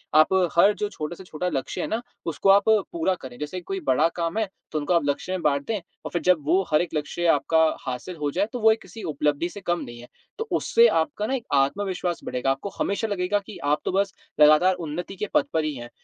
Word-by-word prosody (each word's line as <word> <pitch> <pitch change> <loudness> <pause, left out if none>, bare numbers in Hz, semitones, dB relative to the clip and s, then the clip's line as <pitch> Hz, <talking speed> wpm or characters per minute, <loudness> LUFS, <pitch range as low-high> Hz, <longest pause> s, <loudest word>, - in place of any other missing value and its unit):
आप 155 +4 +6 0.2
हर 200 +4 +6
जो 210 - -1
छोटे 155 -3 -5
से 190 - -11
छोटा 180 +1 -4
लक्ष्य 135 -5 -3
है - - -2
ना, 225 - -2 0.2
उसको 165 +4 0
आप 200 +1 +7
पूरा 190 -4 +1
करें 125 -2 -9
जैसे 150 +5 -5
कि 180 - -6
कोई 195 +2 -4
बड़ा 140 +5 +4
काम 170 +4 -2
है 220 -2 +1 0.2
तो 155 - -1
उनको 150 +5 0
आप 170 - +3
लक्ष्य 145 +6 -2
में 185 -2 -2
बाँट 140 -2 +1
दें 225 - 0 0.3
और - - -5
फिर 175 - -1
जब 180 -2 +4
वो 180 +5 +3
हर 150 - +4
एक 175 - -4
लक्ष्य 150 +3 -2
आपका 165 0 +3 0.2
हासिल 130 +8 -5
हो 150 -2 -2
जाए 190 +6 +1
तो 245 - -3
वो 220 0 +6
एक 220 - -1
किसी 220 -3 -11
उपलब्धि 150 +1 0
से 205 - -10
कम 175 -1 0
नहीं 120 0 -9
है, 120 - -12 0.3
तो 450 +1 -4
उससे 470 +1 +4
आपका 290 - 0
ना 265 - -1
एक 240 - -4
आत्मविश्वास 180 +5 0
बढ़ेगा। 125 +2 -1
आपको 135 +9 -3
हमेशा 210 +3 0
लगेगा 205 0 0
कि - - -9
आप 145 +1 +2
तो - - 0
बस 195 +1 0 0.3
लगातार 155 +5 +6
उन्नति 175 +2 -5
के 210 +3 -3
पथ 300 -2 +4
पर 160 - +1
ही 155 -1 -2
हैं 120 -1 -8
175 Hz, 250 wpm, -25 LUFS, 150-200 Hz, 0.3 s, आप